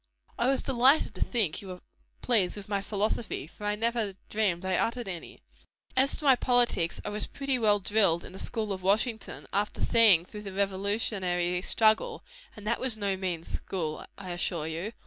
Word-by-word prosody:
"I 240 - +2
was 270 0 +1
delighted 265 0 +3
to 185 - -10
think 210 -11 +1
you 200 - -10
were 180 -1 -7 0.4
pleased 210 -6 +2
with 205 0 -8
my 200 -1 -1
philosophy 210 -2 -2
for 190 +6 -11
I 210 - +1
never 225 -2 -1
dreamed 190 -4 0
I 190 - 0
uttered 235 +4 -1
any. 175 - -7 0.5
As 265 +1 +4
to 300 - -7
my 270 -2 +7
politics, 240 -9 +1
I - - -2
was 210 +1 -3
pretty 275 -2 -2
well 210 -2 +3
drilled 195 -4 +2
in - - -11
the 190 - -8
school 215 -4 -2
of 185 - -6
Washington, 220 +4 -1
after 205 +1 0
seeing 210 -8 +5
through 210 +2 -9
the 200 -2 -7
revolutionary 190 -3 0
struggle; 220 +3 +2 0.3
and 210 - -11
that 235 +2 0
was 255 -4 0
no 200 -2 0
mean 180 -3 -3
school, 160 -3 -4
I 185 -2 -7
assure 175 -2 -2
you. 165 +8 -4
205 Hz, 185 wpm, -28 LUFS, 185-230 Hz, 0.5 s, my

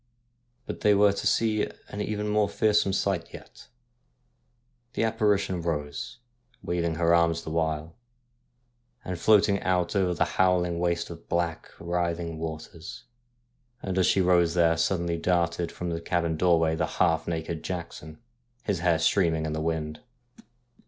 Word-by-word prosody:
But - - -6
they 105 -1 +4
were 100 0 +5
to - - -2
see 110 -2 +1 0.3
even 105 0 -3
a - - -2
more 105 -1 +2
fearsome 105 -3 +2
sight 95 -3 -1
yet. - - -14 1.3
The - - 0
apparition 105 -5 +1
rose, 75 -4 -4 0.5
waving 85 -2 -1
her 85 +1 +2
arms 85 -1 +2
the 80 - -6
while, 80 0 -1 1.1
and 90 -2 -4
floating 100 0 +4
out 90 0 0
over 90 -3 +1
the - - +2
howling 90 -2 +1
waste 85 -1 -1
of 85 - -12
black, 85 -2 -2
writhing 85 -1 -2
waters; 80 0 -7 0.8
and 95 -2 -3
as 95 - +3
she 95 - +3
rose 90 -2 +3
there 85 -1 +4
sud 80 +2 0
denly 85 -1 -2
darted 85 -1 0
from 90 -1 -5
the 85 0 -3
cabin 85 -1 -1
doorway 80 -1 +3
the - - -1
half 80 -3 +2
naked 80 -1 -3
Jackson, 80 -3 -6 0.5
his 100 -5 -1
hair 85 -1 +2
streaming 80 -1 +2
in 80 - -3
the 80 - -2
wind. 80 -1 -2
85 Hz, 150 wpm, -27 LUFS, 80-95 Hz, 1.3 s, were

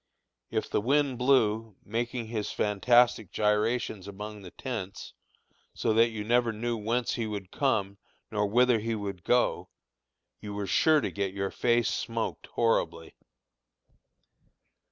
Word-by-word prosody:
If - - -1
the - - 0
wind 135 +1 +1
blew, 115 -5 +2
making 120 +2 -2
his 110 -3 -3
fantastic 110 0 +3
gyrations 105 -1 0
among 105 +1 -7
the 95 - -9
tents, 100 -4 -6 0.6
so 110 - +1
that 115 +1 +5
you 110 -2 -5
never 120 +1 +2
knew 120 +2 -2
whence 115 +3 -1
he 115 -2 -2
would 100 -3 -6
come 100 -8 0 0.3
nor 105 -1 +1
whither 120 +2 +4
he 115 +1 -2
would 100 -4 -5
go, 125 0 +1 0.7
you 105 -1 -7
were 100 -1 -2
sure 155 +9 +4
to - - -2
get 100 -1 -3
your 100 0 -2
face 120 -1 +2
smoked 115 -1 -3
horribly. 85 -8 0
110 Hz, 135 wpm, -28 LUFS, 105-120 Hz, 0.7 s, that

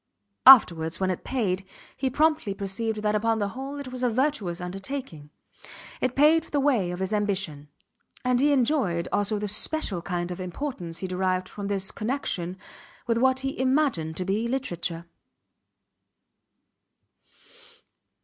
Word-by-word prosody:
Afterwards, 170 -11 +7
when 190 -1 +1
it 180 - -5
paid, 195 -8 -1 0.3
he 265 0 -1
promptly 305 -7 +1
perceived 210 +2 -3
that 210 0 +1
upon 225 +1 +1
the 205 -2 -1
whole 270 +6 -6
it 280 -2 -6
was 255 0 -6
a 250 - +2
virtuous 230 - -1
undertaking. 185 - -6 0.7
It 255 0 0
paved 305 +3 +4
the 290 - +1
way 255 -10 +2
of 180 - -4
his 190 +3 -2
ambition; 195 -8 -1 0.6
and 250 -1 +2
he 290 +2 +4
enjoyed 240 - +1
also 205 +1 +1
the 210 0 -3
special 210 - +1
kind 175 0 -3
of 180 - -6
importance 180 - -5
he 190 - -3
derived 185 0 -1
from 200 +1 -6
this 195 0 0
connection 200 -7 -3 0.5
with 230 -1 +1
what 260 +1 +3
he 270 -1 -4
imagined 255 - +1
to 185 - -2
be 210 +5 0
literature. 175 -10 -3
210 Hz, 145 wpm, -26 LUFS, 180-260 Hz, 0.7 s, Afterwards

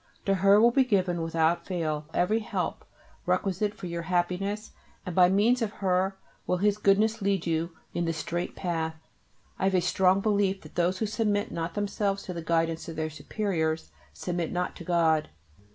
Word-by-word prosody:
To 195 - +3
her 195 +2 +5
will 235 +2 +6
be 265 +2 +4
given 185 -7 +1
without 165 +1 +1
fail 155 -5 -2
every 205 +7 +2
help 220 - -3 0.4
requisite 200 +2 0
for 200 - -8
your 170 -1 -3
happiness, 180 +4 -1 0.3
and 180 - -4
by 180 -1 +6
means 220 +6 +3
of 215 -2 -1
her 190 0 0 0.3
will 180 - +1
His 205 +2 +1
Goodness 215 +3 +3
lead 195 -3 0
you 165 0 -1 0.2
in 175 - -1
the 165 - 0
straight 170 +3 -3
path. 165 -3 -2 0.6
I - - +1
have 190 0 +2
a - - +5
strong 185 +2 +3
belief 200 -2 +1
that - - -13
those 175 +2 +1
who 220 - -1
submit 210 0 0
not 165 0 -4
themselves 200 -1 -1
to 180 - -5
the 170 - -5
guidance 165 0 0
of 165 - -6
their 155 0 -2
Superiors 160 -2 -2 0.2
submit 175 -2 -3
not 180 0 -2
to - - -8
God. 160 -3 +2
180 Hz, 185 wpm, -28 LUFS, 170-200 Hz, 0.6 s, will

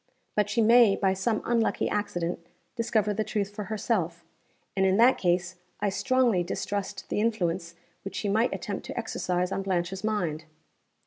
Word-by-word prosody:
But 210 -1 +2
she 225 +2 +2
may, 230 -2 +6
by 190 -2 +2
some 215 +3 -1
unlucky 235 -1 +1
accident, 180 -5 -2 0.4
discover 220 -3 +1
the 215 +2 -1
truth 205 -2 -2
for 210 0 -5
herself 190 -5 -1 0.5
and, 190 - +2
in 190 0 +3
that 240 +3 +5
case, 180 0 0 0.2
I 205 - +1
strongly 245 -1 +2
distrust 195 +2 -4
the - - 0
influence 180 -6 -1 0.3
which 195 - -7
she 210 - -2
might 220 +5 +2
attempt 205 -6 -4
to - - -7
exercise 180 -5 -1
on 195 - -1
Blanche's 190 0 -2
mind." 175 -8 -1
200 Hz, 165 wpm, -27 LUFS, 185-220 Hz, 0.5 s, may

